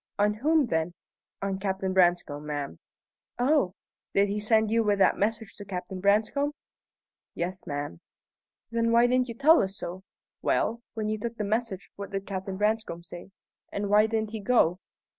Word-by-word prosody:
"On 210 +1 +3
whom, 300 +7 +3
then?" 165 -4 -1 0.5
"On 195 -1 -1
Captain 190 -1 -1
Branscome, 175 -5 +2
ma'am." 145 - -4 0.6
"Oh! 245 - +2 0.4
Did 200 0 +4
he 205 +1 -1
send 220 0 +3
you 230 0 +3
with 205 -1 +2
that 195 - +4
message 220 +1 -1
to 205 - -7
Captain 185 -1 -5
Branscome?" 215 +9 +2 0.8
"Yes, 180 +1 -3
ma'am." 145 - -4 0.7
"Then 230 0 +1
why 235 +1 +6
didn't 250 +1 +2
you 235 - -6
tell 310 +7 +6
us 195 +1 -3
so? 180 +2 -6 0.4
Well, 235 +1 +1
when 215 -1 -2
you 215 0 -1
took 235 +1 -4
the 215 - -1
message, 210 -2 -2
what 200 0 -6
did 195 -1 -4
Captain 190 -1 -4
Branscome 210 -4 0
say? 175 +2 -10 0.4
And 200 0 -2
why 210 +1 +6
didn't 220 -1 -1
he 220 - -4
go?" 200 -5 +3
205 Hz, 170 wpm, -28 LUFS, 185-225 Hz, 0.8 s, why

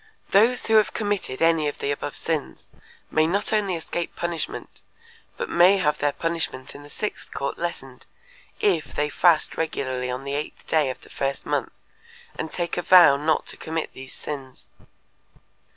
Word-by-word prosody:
Those 230 +5 +4
who 220 0 +5
have 205 -3 +3
committed 205 - -1
any 165 -2 +3
of 145 - -3
the 140 - -1
above 145 0 -4
sins 160 -3 -3 0.4
may 155 0 +3
not 200 +5 0
only 200 -4 +1
escape 170 +1 -4
punishment, 170 -1 -4 0.6
but 480 - -3
may 185 - +5
have 150 -5 +1
their 145 0 +2
punishment 165 -5 -2
in 145 - -10
the 145 - -13
sixth 210 +7 -4
court 140 0 -3
lessened, 135 -7 -5 0.5
if 175 -7 +1
they 150 0 0
fast 165 +2 +3
regularly 130 -5 -2
on 125 +2 -4
the 140 0 -4
eighth 145 +2 -5
day 155 -4 +2
of 130 - -6
the - - -16
first 135 0 -2
month - - -1 0.6
and 160 - -4
take 175 -1 -2
a - - +1
vow 175 -5 +8
not 155 +2 +1
to - - -4
commit 160 0 -4
these 130 0 -10
sins. 135 -3 -7
160 Hz, 170 wpm, -24 LUFS, 140-175 Hz, 0.6 s, vow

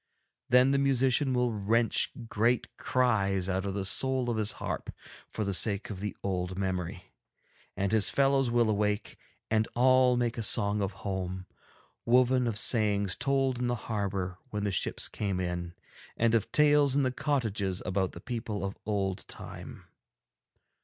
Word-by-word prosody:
Then 125 +2 +5
the 140 - +2
musician 135 0 +2
will 125 -2 +1
wrench 110 +3 +1 0.2
great 115 +2 0
cries 100 -7 +1
out 95 0 -1
of 100 -1 -3
the 100 -1 -2
soul 130 +4 +1
of 115 - -2
his 110 -1 +1
harp - - -5 0.4
for 110 - -3
the 100 -1 -1
sake 100 +2 +2
of 95 - -6
the 105 0 -5
old 90 -1 -2
memory, 90 -2 -4 0.6
and 100 0 0
his 110 -3 +3
fellows 135 -2 +2
will 120 -1 +2
awake 105 -1 -1 0.4
and 110 0 +2
all 130 0 +4
make 120 -1 -1
a - - 0
song 105 -1 +1
of 100 -1 -1
home, 95 -1 -3 0.6
woven 125 +1 +3
of 110 -3 -2
sayings 105 -4 +1
told 135 -2 0
in 125 - 0
the 120 - 0
harbour 100 -5 -3
when 105 -3 -3
the 100 - 0
ships 95 - 0
came 100 -3 -3
in, 90 -1 -4 0.4
and 115 0 +2
of 115 -3 +1
tales 145 -2 +4
in 140 - +3
the 130 - +1
cottages 110 -9 -1
about 95 0 -1
the - - -9
people 115 -5 -4
of 95 - -6
old 100 -3 -2
time. - - -9
110 Hz, 165 wpm, -29 LUFS, 100-125 Hz, 0.6 s, Then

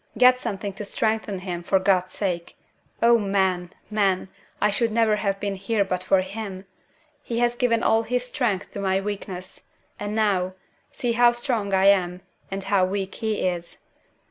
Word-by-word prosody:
"Get 250 0 +6
something 200 -3 -4
to 210 - -7
strengthen 215 -1 -1
him, 180 -2 -4
for 175 - +2
God's 185 -1 +2
sake! 180 -4 -3 0.5
Oh, 235 0 +6
men! 190 -3 +1 0.2
men! 195 -3 +1 0.3
I 210 - +3
should 230 +2 +1
never 220 -1 +3
have 195 -2 -1
been 200 -1 -2
here 200 +2 0
but 185 -1 -2
for 185 0 +3
him! 195 0 -6 0.6
He 230 - -4
has 240 0 +2
given 240 -2 +1
all 225 - +4
his 245 +2 -1
strength 240 -7 -1
to - - -6
my 190 -1 +1
weakness; 195 -2 -6 0.3
and 205 +1 -3
now, 190 -4 +1 0.4
see 245 - -2
how 240 +1 +5
strong 240 -5 -1
I 190 0 +3
am, 180 -2 +3 0.3
and 195 0 -4
how 195 -1 +2
weak 190 +1 -1
he 220 -2 -2
is! 175 -2 -3
200 Hz, 170 wpm, -24 LUFS, 190-225 Hz, 0.6 s, Get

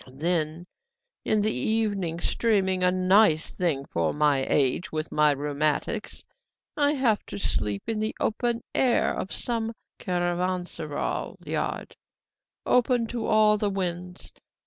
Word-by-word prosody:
Then 160 +4 -2 0.6
in 215 -1 +2
the 215 +1 +1
evening, 195 - -1
streaming 190 -3 +1
a 180 - +5
nice 185 -2 +3
thing 155 -7 0
for 85 -8 -1
my 145 -2 +2
age, 140 +5 +1
with 155 0 -3
my 150 0 +4
rheumatics 150 +8 -1 0.5
I 290 0 +2
have 245 -7 +1
to - - -6
sleep 105 - -1
in 225 -1 -2
the 215 +1 -2
open 235 +1 0
air 250 -3 +2
of 190 - -4
some 230 -1 -1 0.3
caravanseral 175 -3 -2
yard, - - -3 0.7
open 245 -1 +3
to 235 -2 -3
all 215 -1 +4
the 205 - +1
winds. 180 -2 -4
185 Hz, 125 wpm, -26 LUFS, 155-215 Hz, 0.7 s, a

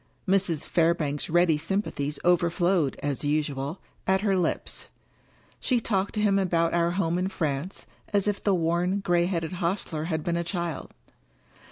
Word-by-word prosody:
Mrs. 185 -5 +1
Fairbank's 160 -4 +1
ready 170 -2 +3
sympathies 155 -5 -2
overflowed, 175 -2 +2
as 145 -1 -2
usual, 145 +1 -1 0.3
at 190 0 +3
her 200 -2 +2
lips. 180 -3 -1 0.7
She 250 -2 +1
talked 200 -2 -1
to - - 0
him 200 -2 +3
about 170 -3 +1
our 170 0 +2
home 175 -1 0
in 185 - 0
France, 165 -1 -3 0.3
as 205 -1 +2
if 205 -1 -1
the 200 -2 +3
worn, 175 +3 +1
gray 175 -2 +2
headed 170 -3 -2
hostler 170 -3 -2
had 160 -2 -2
been 170 -1 0
a 170 - 0
child. 170 -3 -3
170 Hz, 155 wpm, -27 LUFS, 160-190 Hz, 0.7 s, ready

